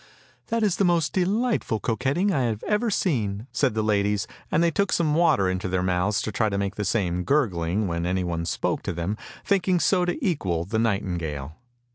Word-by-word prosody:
" - - -33
That 230 -1 0
is 200 -4 +2
the - - +2
most 170 -4 +2
delightful 200 - 0
coquetting 135 - 0
I 135 - +1
have 110 -2 -2
ever 215 +2 +1
seen! 115 - -1
" - - -42
said 130 -6 +1
the 110 - +1
ladies, 105 -1 +1 0.2
and 165 - +2
they 170 - +3
took 200 +4 0
some 155 -3 +2
water 155 - +3
into 95 0 -1
their 90 0 0
mouths 90 +2 +1
to 110 - -3
try 110 +2 +1
and 100 -2 -1
make 100 0 -1
the 105 0 -3
same 90 -4 0
gurgling, 100 - +1
when 85 0 -2
anyone 90 -2 -1
spoke - - -1
to - - -3
them, 85 +5 -2 0.3
thinking 185 -2 +2
so 180 +1 +3
to 175 - -1
equal 90 - -1
the 110 +4 -1
nightingale. 85 -10 -2
110 Hz, 205 wpm, -25 LUFS, -, 0.3 s, they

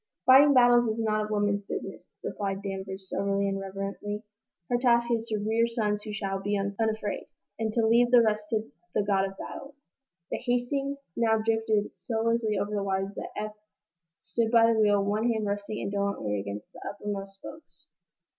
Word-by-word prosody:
"Fighting 275 +2 +8
battles 240 -1 +6
is 220 +1 -1
not 215 -1 0
a - - -6
woman's 205 -1 +1
business," 200 - -7
replied 195 -1 -3
Danvers, 190 -1 -5
soberly 200 +1 0
and 195 0 -1
reverently. 195 +2 -5 0.4
"Her 245 - +1
task 235 -1 +3
is 230 -1 0
to 220 -2 -1
rear 220 +3 +1
sons 210 -3 -1
who 210 - -7
shall 195 -2 -3
be 205 +1 0
unafraid, 205 +1 -2 0.3
and 220 -1 0
to 225 0 +2
leave 235 +2 +5
the 240 -1 +7
rest 210 -1 0
to 215 -8 -2 0.2
the 210 - +3
God 195 -1 +2
of 195 - -14
Battles." 280 +1 -9 0.5
The - - 0
"Hastings" 275 +3 -1 0.2
now 225 -1 +3
drifted 220 -1 +1
so 225 -2 -2
lazily 230 -2 +1
over 200 +2 -1
the 205 -1 -1
waters 195 0 -1
that - - -6
Eph 215 0 -3 0.7
stood 225 +5 -1
by 230 0 +5
the 220 - +1
wheel, 205 -2 +4
one 215 +4 +1
hand 220 -2 -1
resting 205 +1 -3
indolently 200 - -1
against 100 +1 -7
the - - -12
uppermost 200 -1 -5
spokes. 310 +10 -12
210 Hz, 180 wpm, -28 LUFS, 200-230 Hz, 0.7 s, Fighting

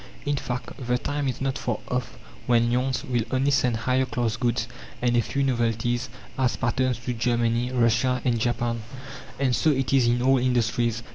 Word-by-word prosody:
In 145 0 +1
fact, 125 -2 -4 0.2
the 125 0 +2
time 145 +2 -2
is 130 -1 -3
not 135 +1 -1
far 120 -3 -1
off 125 0 -3 0.3
when 120 -1 +3
Lyons 125 -1 0
will 120 -2 0
only 135 +2 +1
send 125 -5 +2
higher 130 +3 +1
class 120 -3 -1
goods 120 0 0 0.3
and 120 0 +1
a 120 - +4
few 140 +5 -1
novelties 120 0 0 0.3
as 130 -2 +2
patterns 130 0 0
to 125 - -1
Germany, 120 +1 0
Russia 125 +1 +2
and 120 -2 +2
Japan. 120 0 -1 0.6
And 130 -2 +1
so 160 - +2
it 135 -2 +1
is 130 -3 +4
in 120 +1 +2
all 135 0 +4
industries. 120 -2 +1
125 Hz, 185 wpm, -25 LUFS, 120-130 Hz, 0.6 s, a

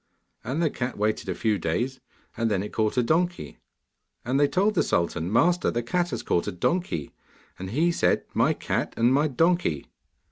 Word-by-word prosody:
And 140 +8 -1
the 155 - +1
cat 125 0 -4
waited 105 +1 -1
a - - -1
few 110 -3 0
days, 120 +12 -2 0.4
and 115 -1 0
then 100 -2 0
it 105 - -7
caught 110 +2 0
a 125 - +4
donkey, 175 +7 -1 0.7
and 130 +3 +1
they 145 - +5
told 190 +9 +1
the 185 - +2
sultan, 85 0 -1
'Master, 175 +10 +3
the 120 - -2
cat 175 +8 0
has - - -4
caught 85 - 0
a - - -1
donkey,' 90 - -2 0.5
and 95 0 -5
he 160 - +2
said, - - +1
'My - - +3
cat - - -3
and 120 +2 +3
my 145 +3 +3
donkey. 165 - +1
125 Hz, 190 wpm, -26 LUFS, 105-170 Hz, 0.7 s, they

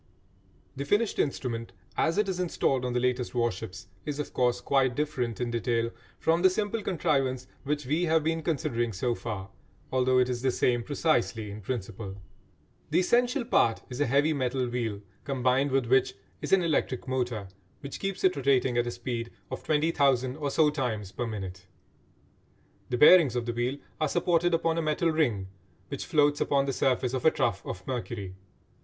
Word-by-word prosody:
The 140 - -3
finished 205 +9 +1
instrument 115 -7 -2 0.2
as 165 +3 +1
it 210 -1 +2
is 185 -2 -2
installed 135 -7 0
on 125 - -2
the 125 - +1
latest 125 0 -1
warships 115 -7 -2 0.2
is, 145 -1 -4
of 150 - -4
course, 125 -1 +2
quite 130 -1 +2
different 130 -6 -2
in 120 -1 -1
detail 115 0 0 0.3
from 165 +1 +2
the 185 - +7
simple 210 +3 -1
contrivance 135 -9 0 0.2
which 145 0 -1
we 155 +7 +1
have 160 -1 +2
been 160 +1 0
considering 120 -7 -1
so 120 +6 0
far, 100 -5 -6 0.4
although 130 0 +3
it 125 -1 +4
is 125 -1 -2
the 130 - +2
same 120 -1 +1
precisely 120 -6 0
in 105 +1 -8
principle. 100 -2 -5 0.7
The 160 +4 +3
essential 245 +5 +2
part 115 - +2
is 125 +3 -4
a 145 - +3
heavy 145 +5 +3
metal 130 -2 -1
wheel 115 -4 -3 0.2
combined 130 +1 +1
with 135 -2 +1
which 130 +2 +3 0.3
is - - -4
an 195 -2 +5
electric 145 -6 0
motor 120 -6 -2 0.3
which 140 -1 -7
keeps 195 -1 -3
it 185 -1 +4
rotating 130 -3 +2
at 120 - 0
a - - -1
speed 120 -1 -4 0.2
of - - -5
20,000 140 -5 +2
or 145 -2 -2
so 150 +1 +3
times 110 -9 -3
per 120 +2 -3
minute. 95 -4 -6 1.2
The 125 - 0
bearings 150 -3 +7
of 120 -1 -1
the 120 - -2
wheel 120 +4 -1 0.2
are 155 - +1
supported 175 0 +2
upon 165 0 +1
a - - +1
metal 155 +2 +1
ring 120 -12 0 0.4
which - - -5
floats 145 -1 +3
upon 140 -1 +2
the 135 - -1
surface 125 -1 +1
of 130 - -2
a - - +7
trough - - -1
of 90 0 -7
mercury. 120 -7 -4
130 Hz, 180 wpm, -28 LUFS, 120-155 Hz, 1.2 s, the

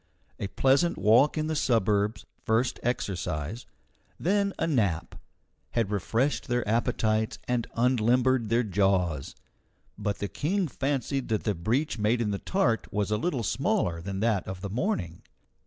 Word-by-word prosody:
A 100 - -2
pleasant 135 - +2
walk 120 +9 +4
in 155 - 0
the 155 0 -1
suburbs 105 -5 +1 0.2
first 115 +3 +1
exercise 95 - -3 0.5
then 200 +2 +1
a - - 0
nap, 105 - 0 0.6
had 110 -3 +1
refreshed 115 +8 0
their 120 -3 0
appetites 110 -1 +1
and 125 -2 0
unlimbered 125 0 +2
their 115 +2 +3
jaws. 95 - 0 0.6
But 100 -1 -1
the 100 - -3
King 180 - -1
fancied 135 -1 -2
that 110 -2 -1
the 105 - +1
breach 115 - -1
made 110 +3 +2
in 110 -3 0
the 100 - -2
tart 125 -13 0
was 105 0 -1
a 105 - +2
little 130 -1 -1
smaller 85 -2 0
than 95 +2 -4
that 110 -4 +1
of 95 -1 -6
the 100 - -5
morning. 105 - -2
115 Hz, 150 wpm, -28 LUFS, 100-130 Hz, 0.6 s, walk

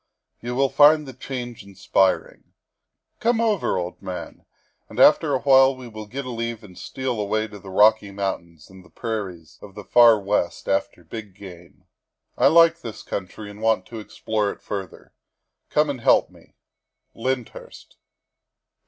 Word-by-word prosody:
You 120 +1 -4
will 135 +1 +2
find 150 +1 +5
the 130 - -8
change 125 -3 -7
in 100 -1 -16
spiring. 95 0 0 0.7
Come 235 0 +1
over, 215 - +1
old 90 0 -5
man, 95 -2 -8 0.4
and - - -8
after - - +5
awhile 135 -1 +5
we 130 -1 -10
will 110 -2 -9
get 135 +5 -6
a 125 - -5
leave 115 -1 -4
and 95 -3 -14
steal 125 -1 -4
away 110 +2 -1
to 105 -1 -12
the 95 - -12
Rocky 105 +2 +4
Mountains 95 -5 -5
and 95 -1 -15
the - - -20
prairies 95 - -6
of 100 -1 -13
the 105 - -8
far 115 0 +6
West 100 -3 -2
after 95 -2 -1
big 105 +2 -9
game. 90 -4 -14 0.5
I - - +4
like 165 0 +5
this 115 -2 -8
country 100 +2 -6
and 105 +1 -13
want 110 -4 +1
to 115 - -7
explore 105 0 -2
it - - -9
further. 95 -4 -7 0.6
Come 150 0 +2
and 140 -4 -4
help - - +3
me. - - -21 0.3
" - - -56
LYNDHURST." 125 0 -6
110 Hz, 165 wpm, -23 LUFS, 95-125 Hz, 0.7 s, far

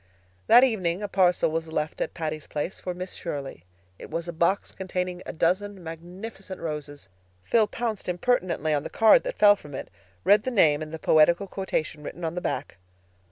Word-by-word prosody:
That 245 - +8
evening 195 -7 +1
a - - -1
parcel 180 -4 +3
was 160 0 -3
left 155 0 -2
at - - -3
Patty's 155 -2 -4
Place 150 +5 -4
for 180 -1 -5
Miss 180 +1 -5
Shirley. 140 - -6 0.3
It - - -10
was 165 +2 -3
a 170 - -4
box 170 +4 +1
containing 180 -1 -4
a - - -3
dozen 190 +3 0
magnificent 185 +4 -8
roses. 150 -6 -6 0.4
Phil 220 - +3
pounced 220 -3 -3
impertinently 180 -5 0
on 145 - +1
the - - -6
card 225 - +6
that - - -4
fell 205 -1 +7
from 145 -8 -11
it, - - -7 0.3
read 205 +3 +5
the 260 - -2
name 160 -11 +4
and 155 0 -6
the 160 - -5
poetical 160 +4 +4
quotation 160 -6 -3
written 165 +3 -6
on 160 - -2
the 180 - -4
back. 175 - -3
175 Hz, 190 wpm, -26 LUFS, 160-195 Hz, 0.4 s, That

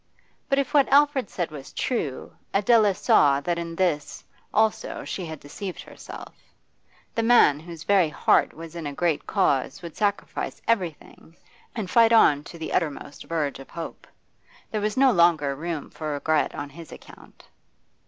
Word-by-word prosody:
But 275 - +2
if 275 +1 -1
what 285 -2 +4
Alfred 285 -4 +4
said 175 -3 -3
was 140 -3 -9
true, 155 - -3 0.2
Adela 210 -1 +4
saw 140 -5 +4
that 170 +2 -1
in 170 0 -5
this 165 -5 -1 0.3
also 220 0 0
she 180 -3 -5
had 160 -2 -7
deceived 180 +7 -7
herself: - - -11 0.8
the 230 - 0
man 225 - +5
whose 165 0 -10
very 185 -2 +3
heart - - +2
was 165 +1 -11
in 165 -3 -5
a 145 - -5
great 165 0 -1
cause 145 -6 0
would 170 -2 -8
sacrifice 205 -2 -2
everything, 175 -5 -3 0.4
and 220 -5 -3
fight 230 +3 +5
on 150 -10 +5
to 170 - -10
the 160 - -5
uttermost 145 -3 -3
verge 155 -5 -2
of 135 - -12
hope. 165 -1 -8 0.6
There 215 - -2
was 210 +2 -2
no 265 -1 +5
longer 170 - +3
room 160 0 -5
for 155 -2 -4
regret 150 +1 0
on 145 0 -6
his 165 +2 -12
account. - - -15
170 Hz, 165 wpm, -25 LUFS, 150-210 Hz, 0.8 s, man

